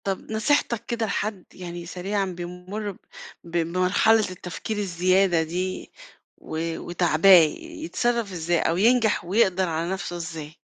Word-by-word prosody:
طَب 195 +2 -4
نصيحتك 230 0 +1
كده 230 -1 -2
لحد- 205 -2 -3
يعني 175 -1 -7
سريعًا- 195 +3 -2
بيمُر 180 +4 -5
ب 190 - -15 0.5
ب 170 - -13
بمرحلة 180 +6 +3
التفكير 185 +4 -6
الزيادة 185 -2 +2
دي 180 +3 -4 0.5
و 165 +1 -4
وتاعباه، 175 +1 +2 0.3
يتصرّف 275 -10 -2
إزاي 170 -1 0
أو 165 - +1
ينجَح 225 -2 +3
ويقدَر 190 -1 +2
على 165 +1 -2
نفْسه 175 -2 -4
إزاي؟ 160 -2 -7
185 Hz, 130 wpm, -24 LUFS, 170-210 Hz, 0.5 s, بمرحلة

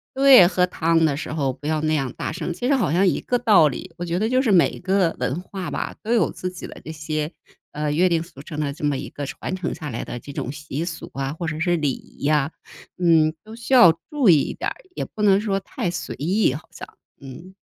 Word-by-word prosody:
对 265 -9 +8
喝 180 0 +2
汤 165 -2 +2
的 145 - +1
时 145 - -5
候 140 -4 -1
不 135 +3 -14
要 155 -1 +1
那 155 0 +1
样 135 -4 -1
大 - - -4
声， 170 0 -4
其 245 +8 -3
实 280 - +4
好 200 - +1
像 185 +4 +3
一 - - +1
个 245 - 0
道 210 -10 +5
理。 165 +6 -8
我 175 - -4
觉 170 +1 -1
得 215 - +1
就 255 +2 +2
是 245 -5 +1
每 180 -4 +3
个 185 -2 +1
文 130 +5 -1
化 185 0 -6
吧， - - -4
都 225 - -3
有 235 - +3
自 185 - -5
己 180 - -8
的 - - -11
这 160 - -7
些， 155 0 -3 0.4
呃， 150 0 -2
约 180 +4 +3
定 165 -2 +1
俗 165 -5 -11
成 150 +1 -7
的 145 -2 -1
这 155 - -12
么 145 -2 +1
一 - - -6
个 145 - -6
传 175 +6 -5
承 185 -2 -3
下 150 -4 -6
来 120 - -4
的 120 - -6
这 140 - -10
种 130 - -4
习 150 +1 -5
俗 170 -1 -6
啊， 135 0 -3
或 165 +1 -5
者 155 -1 -3
是 175 -1 +2
礼 150 -3 +1
仪 - - -10
呀， 150 0 +2 0.5
嗯， 160 -3 +4
都 220 +1 -10
需 235 +3 -4
要 175 -10 +8 0.2
注 290 -6 +1
意 155 -4 +6
一 - - -3
点 - - -2
儿。 - - -8 0.2
也 - - -3
不 215 - -8
能 200 -2 +5
说 205 -2 -1
太 195 0 -4
随 170 - -5
意 180 0 +1
好 145 - -8
像， - - -10 0.3
嗯。 140 +8 -11
165 Hz, 280 characters per minute, -22 LUFS, 150-190 Hz, 0.5 s, 对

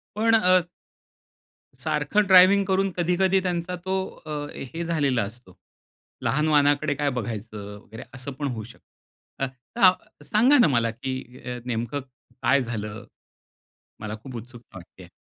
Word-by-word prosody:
पण 225 +1 +3
अ 180 -2 +4 1.2
सारखं 210 -1 +1
ड्रायव्हिंग 190 +1 +7
करून, 195 0 +1
कधी-कधी 180 +2 +2
त्यांचा 180 0 -2
तो 190 0 0 0.3
अ, - - -7 0.2
हे 165 +6 -6
झालेला 140 -8 +1
असतो. 100 -2 -9 0.7
लहान 150 +3 +1
वाहनाकडे 145 0 +3
काय 145 0 0
बघायचं 110 -4 -5 0.2
वगैरे, 110 +2 -11
असं 135 +1 -6
पण 145 +2 -4
होऊ 115 -5 -4
शकतं. 120 +3 -11
अ, - - 0 0.3
तर 195 0 +2
सांगा 250 +7 +4
ना, 240 - +6
मला 120 -3 +2
की 130 +4 -5 0.3
अ, 125 0 -4
नेमकं 120 +4 -2 0.4
काय 140 -1 +4
झालं? 105 -3 -5 1.0
मला 110 0 -5
खूप 130 -2 -9
उत्सुकता 120 -3 -11
वाटतेय. 90 0 -14
140 Hz, 140 wpm, -25 LUFS, 120-185 Hz, 1.2 s, ड्रायव्हिंग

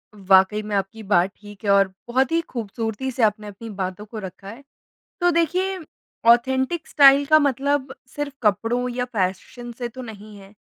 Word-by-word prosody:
वाक़ई 195 +1 +3
में, 210 -1 -4
आपकी 200 +3 -3
बात 190 -2 +2
ठीक 205 0 -13
है - - 0
और 195 -1 +5 0.2
बहुत 260 +5 +1
ही 330 - +2
खूबसूरती 225 +2 -4
से 240 -2 -1
आपने 210 0 +1
अपनी 215 +3 -9
बातों 190 0 -5
को 215 0 -8
रखा 190 0 -9
है। 245 +6 -11 0.6
तो 350 - +4
देखिए, 365 +4 0 0.5
ऑथेंटिक 260 +7 +2
स्टाइल 280 -1 +6
का 310 +1 +5
मतलब 280 0 0 0.2
सिर्फ़ 290 -1 -4
कपड़ों 225 +4 +1
या 250 0 -1
फ़ैशन 230 +2 -4
से 240 -1 -3
तो 255 +2 -10
नहीं 215 -2 -10
है, 195 +1 -15
230 Hz, 175 wpm, -22 LUFS, 205-265 Hz, 0.6 s, स्टाइल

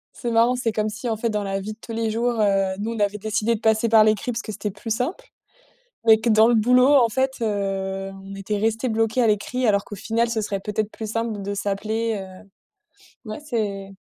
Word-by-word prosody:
C'est 240 - -4
marrant, 230 +2 +4
c'est 245 -2 -1
comme 215 0 0
si 215 +3 -6
en 225 - 0
fait 230 +2 -1
dans 210 -1 -1
la 195 0 -2
vie 215 +2 -5
de - - -19
tous 230 - -8
les 225 -1 -1
jours, 235 +2 0
heu, 195 -2 +2
nous 220 +3 -2
on 225 - -6
avait 205 0 +1
décidé 215 +2 0
de - - -7
passer 220 +1 +2
par 220 -1 +6
l'écrit 215 +3 +1
parce 235 0 -3
que 220 - -7
c'était 210 0 -4
plus 210 +3 -4
simple. 280 - -3 0.8
Mais 220 -1 +7
que 235 - -1
dans 220 0 +6
le 240 - +3
boulot 250 +5 +5
en 240 -4 +5
fait, 265 +3 0
heu, 195 -2 -2
on 195 0 -8
était 195 +2 -3
resté 225 +4 0
bloqué 225 +2 +1
à - - +4
l'écrit 230 +4 0
alors 200 -2 +2
qu'au - - -8
final 230 +4 0
ce 230 -1 0
serait 200 -2 -3
peut-être 210 +1 -2
plus 220 -1 -6
simple 230 +1 -1
d 200 -1 -5
de - - -2
s'appeler. 215 +3 -2
Heu, 190 +1 -12 0.7
ouais 215 - -5
c'est 205 -8 -3
220 Hz, 240 wpm, -23 LUFS, 205-230 Hz, 0.8 s, Mais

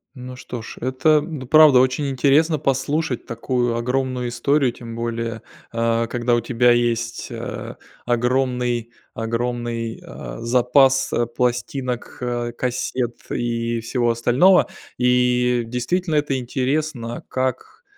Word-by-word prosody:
Ну 125 0 -8
что 125 -2 -7
ж, - - -9
это 130 +4 +3
д 150 -6 -6
правда 155 -1 +7
очень 130 +3 +1
интересно 150 +4 +3
послушать 135 +1 -1
такую 120 0 -1
огромную 125 +1 -1
историю, 130 +2 +1
тем 115 -1 -9
более, 115 -1 -3 0.3
а, 115 0 0
когда 120 0 0
у 120 - +3
тебя 120 +1 +3
есть, 120 -1 0
э, - - -6 0.3
огромный 125 -1 0 0.2
огромный, 115 0 -3
а, - - -8
запас 130 +3 +3 0.2
пластинок, 125 0 -2 0.4
кассет 125 -1 -2
и 115 -1 -1
всего 120 0 0
остального. 125 +11 +4 0.3
И 125 0 +2
действительно, 155 +8 -1
это 145 -2 +1
интересно, 130 -1 -2
как, 280 - -3
125 Hz, 115 wpm, -21 LUFS, 120-135 Hz, 0.4 s, правда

